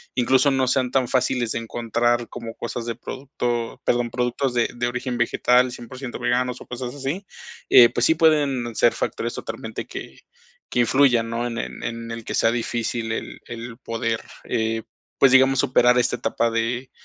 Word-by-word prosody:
incluso 130 Hz, +3 st, +3 dB
no 130 Hz, -1 st, +1 dB
sean 125 Hz, 0 st, +1 dB
tan 130 Hz, -2 st, +2 dB
fáciles 125 Hz, -2 st, 0 dB
de -, -, -1 dB
encontrar 120 Hz, +1 st, 0 dB
como 115 Hz, -2 st, -7 dB
cosas 115 Hz, 0 st, -5 dB
de 115 Hz, -1 st, -3 dB
producto, 120 Hz, -2 st, -4 dB
perdón, 120 Hz, -1 st, +1 dB
productos 125 Hz, +2 st, -1 dB
de 120 Hz, -1 st, +1 dB
de 120 Hz, 0 st, -1 dB
origen 125 Hz, 0 st, -3 dB
vegetal, 125 Hz, +2 st, +3 dB
100% 125 Hz, +1 st, -8 dB
veganos 125 Hz, 0 st, 0 dB
o -, -, -12 dB
cosas 125 Hz, 0 st, -5 dB
así, 145 Hz, +8 st, -4 dB, 0.4 s
eh, 120 Hz, -, +9 dB
pues 120 Hz, -, 0 dB
sí 160 Hz, -, +4 dB
pueden 145 Hz, -7 st, +2 dB
ser 120 Hz, -, +4 dB
factores -, -, -3 dB
totalmente -, -, -6 dB
que -, -, -8 dB, 0.5 s
que 120 Hz, -, +2 dB
influyan, 120 Hz, -2 st, +3 dB
¿no?, 120 Hz, +1 st, -1 dB
en 115 Hz, -1 st, -5 dB
el -, -, -5 dB
en 115 Hz, 0 st, -5 dB
el 115 Hz, 0 st, -6 dB
que -, -, -4 dB
sea 115 Hz, -, +3 dB
difícil 115 Hz, -1 st, -2 dB
el 115 Hz, -, -5 dB
el 115 Hz, 0 st, -7 dB
poder, 115 Hz, -2 st, -2 dB, 0.2 s
eh, 110 Hz, 0 st, -1 dB, 0.3 s
pues, 135 Hz, -, +5 dB
digamos, 130 Hz, +1 st, +5 dB
superar 125 Hz, -1 st, +4 dB
esta 125 Hz, -, +2 dB
etapa 115 Hz, 0 st, 0 dB
de, 120 Hz, +3 st, -2 dB
120 Hz, 175 wpm, -23 LUFS, 115-130 Hz, 0.5 s, eh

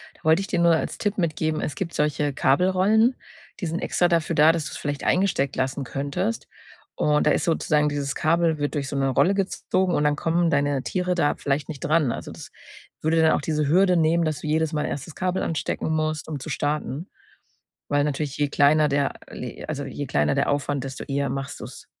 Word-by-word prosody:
da -, -, -25 dB
wollte 160 Hz, +4 st, +4 dB
ich 195 Hz, -, -5 dB
dir 175 Hz, -, -1 dB
nur 170 Hz, -1 st, +5 dB
als -, -, -3 dB
Tipp 205 Hz, -1 st, -2 dB
mitgeben, 155 Hz, -2 st, -1 dB
es 140 Hz, -, -3 dB
gibt 170 Hz, 0 st, -4 dB
solche 150 Hz, -1 st, 0 dB
Kabelrollen, 190 Hz, -, +3 dB, 0.5 s
die 175 Hz, -, -1 dB
sind 165 Hz, +2 st, -2 dB
extra 175 Hz, -1 st, +1 dB
dafür 165 Hz, -1 st, +1 dB
da, 155 Hz, +2 st, +6 dB
dass 165 Hz, -2 st, -2 dB
du -, -, -5 dB
es -, -, -6 dB
vielleicht 145 Hz, -1 st, -4 dB
eingesteckt 180 Hz, -8 st, +1 dB
lassen 130 Hz, +1 st, -2 dB
könntest. 145 Hz, -, -3 dB, 0.5 s
Und, 150 Hz, 0 st, +2 dB
da -, -, +5 dB
ist -, -, +1 dB
sozusagen 150 Hz, -2 st, +2 dB
dieses 140 Hz, -1 st, -3 dB
Kabel 165 Hz, 0 st, +2 dB
wird 145 Hz, 0 st, -2 dB
durch 140 Hz, -2 st, -2 dB
so 140 Hz, -, -3 dB
'ne 135 Hz, 0 st, +1 dB
Rolle 175 Hz, +9 st, +3 dB
gezogen 190 Hz, -1 st, 0 dB
und 150 Hz, -, +1 dB
dann 150 Hz, 0 st, +2 dB
kommen 170 Hz, +1 st, +1 dB
deine 145 Hz, -3 st, +1 dB
Tiere 180 Hz, -1 st, -1 dB
da 145 Hz, -4 st, +1 dB
vielleicht 140 Hz, 0 st, -2 dB
nicht 150 Hz, -3 st, -6 dB
dran. 155 Hz, -4 st, +2 dB
Also, -, -, -7 dB
das -, -, -11 dB, 0.5 s
würde 160 Hz, +1 st, +2 dB
dann 160 Hz, -, +5 dB
auch -, -, +1 dB
diese 150 Hz, -1 st, -1 dB
Hürde 180 Hz, +3 st, +4 dB
nehmen, 165 Hz, +1 st, +3 dB
dass 155 Hz, -2 st, -2 dB
du -, -, -5 dB
jedes 155 Hz, +1 st, +1 dB
Mal 150 Hz, -, 0 dB
erst 140 Hz, -, -4 dB
das 165 Hz, -, -11 dB
Kabel 185 Hz, 0 st, -1 dB
anstecken 160 Hz, 0 st, -2 dB
musst, 155 Hz, 0 st, -1 dB
um 150 Hz, -3 st, -4 dB
zu 145 Hz, -, -7 dB
starten. 150 Hz, +2 st, -2 dB, 0.8 s
Weil 145 Hz, 0 st, +2 dB
natürlich, 145 Hz, -1 st, -2 dB
je 145 Hz, -1 st, +1 dB
kleiner 150 Hz, +2 st, +4 dB
der 140 Hz, 0 st, 0 dB, 0.2 s
le 125 Hz, -, -7 dB
also, 145 Hz, -2 st, -3 dB
je 140 Hz, +1 st, -5 dB
kleiner 75 Hz, -7 st, +1 dB
der -, -, +1 dB
Aufwand, 140 Hz, -1 st, -1 dB
desto 135 Hz, 0 st, -6 dB
eher 140 Hz, 0 st, -1 dB
machst 135 Hz, +1 st, -4 dB
du's. -, -, -10 dB
155 Hz, 220 wpm, -24 LUFS, 140-170 Hz, 0.8 s, da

